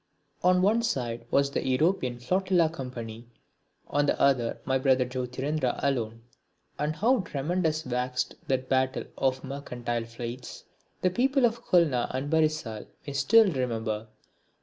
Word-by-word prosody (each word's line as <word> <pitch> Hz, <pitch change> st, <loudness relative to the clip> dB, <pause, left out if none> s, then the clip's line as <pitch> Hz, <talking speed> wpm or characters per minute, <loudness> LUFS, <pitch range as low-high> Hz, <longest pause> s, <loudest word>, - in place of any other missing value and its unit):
On 180 Hz, 0 st, +4 dB
one 220 Hz, +4 st, +4 dB
side 120 Hz, -, -2 dB
was 140 Hz, 0 st, +2 dB
the -, -, -1 dB
European 130 Hz, -1 st, +1 dB
Flotilla 180 Hz, +5 st, +2 dB
Company, 120 Hz, -6 st, -7 dB, 0.6 s
on 145 Hz, 0 st, +1 dB
the -, -, +1 dB
other 125 Hz, -4 st, +2 dB
my 130 Hz, 0 st, +1 dB
brother 130 Hz, -1 st, +3 dB
Jyotirindra 130 Hz, +2 st, -2 dB
alone; 115 Hz, -5 st, -1 dB, 0.6 s
and 150 Hz, +1 st, -1 dB
how 245 Hz, +8 st, +3 dB
tremendous 160 Hz, -1 st, -1 dB
waxed 125 Hz, +1 st, -1 dB
that 130 Hz, -1 st, 0 dB
battle 130 Hz, 0 st, +1 dB
of 130 Hz, -1 st, 0 dB
the -, -, -9 dB
mercantile 120 Hz, -4 st, -4 dB
fleets, 120 Hz, +2 st, -7 dB, 0.4 s
the 185 Hz, -, +2 dB
people 265 Hz, +5 st, +3 dB
of 235 Hz, 0 st, -1 dB
Khulna 155 Hz, -9 st, +3 dB
and 140 Hz, +3 st, -3 dB
Barisal 155 Hz, -9 st, 0 dB, 0.2 s
may 140 Hz, -, -5 dB
still 200 Hz, +10 st, +5 dB
remember. 115 Hz, -5 st, -2 dB
135 Hz, 140 wpm, -28 LUFS, 125-160 Hz, 0.6 s, still